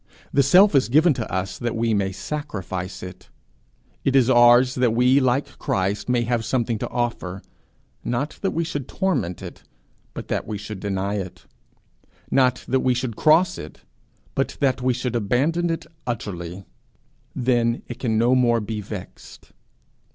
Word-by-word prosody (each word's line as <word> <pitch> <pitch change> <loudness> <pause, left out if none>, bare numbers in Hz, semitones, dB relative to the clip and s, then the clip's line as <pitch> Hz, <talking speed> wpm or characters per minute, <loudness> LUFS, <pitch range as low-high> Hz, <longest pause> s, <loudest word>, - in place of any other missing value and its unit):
The 140 - +5
self 180 +9 +6
is 135 -4 +3
given 155 +5 +5
to 120 -4 -5
us 95 0 -3
that 120 -1 -2
we 115 0 +1
may 100 -2 0
sacrifice 95 - -5
it; 90 0 -10 0.7
it 135 - +1
is 130 -1 +5
ours 120 +1 +6
that 125 -3 +1
we 125 +3 +4
like 130 +1 0
Christ 95 +4 -1
may 120 -1 +2
have 120 -1 0
somewhat 115 -2 -1
to - - -3
offer 115 -6 -3 0.6
not 135 +5 -3
that 195 - +1
we 170 - -1
should 145 -5 -4
torment 135 - -1
it, - - -9 0.5
but - - -6
that - - -2
we 105 - -3
should 105 0 -7
deny 100 0 -2
it; 95 -2 -8 0.9
not 130 -2 +2
that 130 +1 +2
we 130 -1 +2
should 120 -2 -3
cross 170 +7 +3
it, - - -10 0.5
but - - -2
that 135 -2 +1
we 130 +1 +2
should 125 -1 -3
abandon 140 +11 +1
it 165 - -3 0.2
utterly: 95 -5 -5 0.7
then 120 -1 +1
it 120 - -7
can 110 -4 0
no 120 +3 +3
more 120 -2 +3
be 105 0 -4
vexed. 100 -2 -10
120 Hz, 165 wpm, -23 LUFS, 105-130 Hz, 0.9 s, self